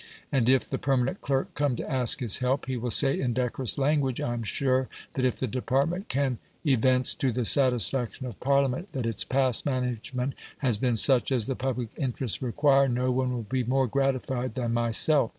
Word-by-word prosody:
And 125 Hz, -3 st, +2 dB
if 130 Hz, -1 st, +3 dB
the -, -, -3 dB
permanent 135 Hz, +6 st, 0 dB
clerk 135 Hz, -1 st, -1 dB
come 145 Hz, -4 st, 0 dB
to -, -, -5 dB
ask 130 Hz, -2 st, 0 dB
his 115 Hz, -5 st, +1 dB
help, 130 Hz, +2 st, 0 dB
he 130 Hz, 0 st, -3 dB
will 120 Hz, 0 st, -3 dB
say 135 Hz, +5 st, +4 dB
in 125 Hz, -2 st, -1 dB
decorous 125 Hz, 0 st, 0 dB
language, 140 Hz, -2 st, +1 dB
"I 120 Hz, -, -2 dB
am 120 Hz, -, -3 dB
sure 130 Hz, +3 st, 0 dB, 0.2 s
that 130 Hz, -, -1 dB
if 125 Hz, -, 0 dB
the -, -, 0 dB
department 135 Hz, -, -1 dB
can 135 Hz, -3 st, -1 dB, 0.3 s
evince 130 Hz, -2 st, +3 dB
to 130 Hz, -, -1 dB
the 120 Hz, 0 st, -2 dB
satisfaction 130 Hz, 0 st, +1 dB
of 120 Hz, -6 st, -8 dB
Parliament 140 Hz, +6 st, 0 dB
that 130 Hz, -5 st, -3 dB
its 115 Hz, -3 st, -1 dB
past 130 Hz, -3 st, +1 dB
management 125 Hz, 0 st, -2 dB, 0.2 s
has 120 Hz, -7 st, 0 dB
been 125 Hz, -1 st, +1 dB
such 130 Hz, +4 st, +4 dB
as 125 Hz, -5 st, +1 dB
the 135 Hz, -, -2 dB
public 125 Hz, -3 st, -3 dB
interests 130 Hz, -4 st, -1 dB
require, 135 Hz, +2 st, +3 dB
no 125 Hz, +1 st, 0 dB
one 130 Hz, 0 st, 0 dB
will 120 Hz, -2 st, -3 dB
be 125 Hz, +4 st, -2 dB
more 130 Hz, +3 st, +1 dB
gratified 130 Hz, -1 st, -1 dB
than 120 Hz, -3 st, -2 dB
myself. 120 Hz, +3 st, +2 dB
130 Hz, 195 wpm, -27 LUFS, 120-135 Hz, 0.3 s, say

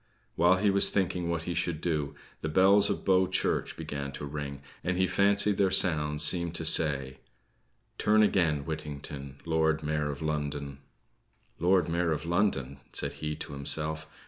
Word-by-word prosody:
While 90 Hz, +2 st, +4 dB
he 100 Hz, +2 st, +1 dB
was 100 Hz, 0 st, +3 dB
thinking 90 Hz, -3 st, -1 dB
what 85 Hz, -1 st, -2 dB
he 85 Hz, -, -4 dB
should 85 Hz, -2 st, -2 dB
do, 75 Hz, -4 st, -2 dB, 0.3 s
the 80 Hz, -, -3 dB
bells 100 Hz, +5 st, +4 dB
of -, -, -3 dB
Bow 95 Hz, -1 st, +3 dB
Church 95 Hz, -, -2 dB
began 70 Hz, -1 st, -5 dB
to 75 Hz, -, -6 dB
ring, 70 Hz, -1 st, -6 dB, 0.2 s
and 90 Hz, 0 st, -1 dB
he 95 Hz, -, +2 dB
fancied 100 Hz, +2 st, +2 dB
their 95 Hz, -1 st, +2 dB
sounds 75 Hz, -5 st, +4 dB
seemed 85 Hz, -1 st, +1 dB
to 80 Hz, -, -2 dB
say: 70 Hz, -5 st, +5 dB, 0.8 s
"Turn 110 Hz, 0 st, +3 dB
again, 80 Hz, -8 st, +1 dB
Whittington, 75 Hz, -3 st, -7 dB
Lord 80 Hz, -1 st, 0 dB
Mayor 75 Hz, -1 st, -2 dB
of 70 Hz, +2 st, -6 dB
London." 70 Hz, -2 st, -4 dB, 0.8 s
"Lord 90 Hz, 0 st, +2 dB
Mayor 85 Hz, 0 st, 0 dB
of 80 Hz, +1 st, -3 dB
London!" 85 Hz, -7 st, -1 dB
said -, -, -3 dB
he 75 Hz, 0 st, -3 dB
to -, -, -8 dB
himself. 75 Hz, +2 st, -3 dB
80 Hz, 165 wpm, -28 LUFS, 75-90 Hz, 0.8 s, say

